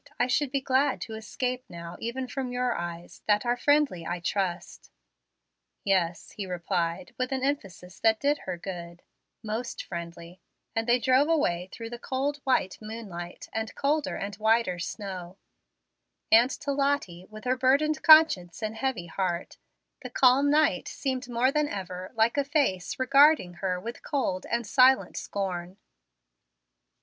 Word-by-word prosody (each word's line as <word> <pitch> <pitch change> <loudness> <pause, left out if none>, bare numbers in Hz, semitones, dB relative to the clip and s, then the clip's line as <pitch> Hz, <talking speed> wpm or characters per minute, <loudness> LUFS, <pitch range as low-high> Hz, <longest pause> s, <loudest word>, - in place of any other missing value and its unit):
I 245 - +4
should 265 +3 +1
be 275 -1 0
glad 265 +1 +2
to 225 - -6
escape 250 +3 -3
now 170 0 -8
even 255 +3 -4
from 255 -1 -4
your 250 0 0
eyes, 170 0 -6
that 210 +2 +3
are 240 0 +2
friendly, 285 - +2
I 175 +2 -3
trust." 180 0 -3 0.9
"Yes," 180 -4 0
he 200 -3 -6
replied, 175 0 -2
with 255 +1 -1
an 265 -1 -1
emphasis 195 -10 -3
that 220 -1 +3
did 290 +1 +1
her 175 - -3
good, 170 -1 -8 0.4
"most 225 +3 -4
friendly"; 170 0 -8 0.3
and 225 +1 -1
they 240 +1 +5
drove 260 +5 +3
away 185 - +1
through 230 0 -8
the 240 - -6
cold 275 +3 -2
white 260 -9 0
moonlight 205 -6 -7
and 220 0 -3
colder 295 +2 0
and 200 +1 -4
whiter 220 -4 +2
snow; 185 -1 -6 0.9
and 235 +3 +7
to 280 +1 -4
Lottie, 275 -11 -1
with 215 0 -11
her 255 +1 +1
burdened 280 +4 +2
conscience 310 - +6
and 215 +1 -3
heavy 235 -7 -2
heart, 175 0 -3 0.4
the 250 - -7
calm 260 +3 +4
night 295 -10 +2
seemed 260 -2 -3
more 245 +2 +2
than 300 +1 +1
ever 185 -5 -6
like 225 +4 +2
a 285 - +3
face 275 - 0
regarding 275 - +5
her 185 -2 -1
with 235 +5 -7
cold 220 -11 -2
and 235 +1 -1
silent 260 +4 +4
scorn. 185 -2 -4
225 Hz, 155 wpm, -27 LUFS, 180-265 Hz, 0.9 s, and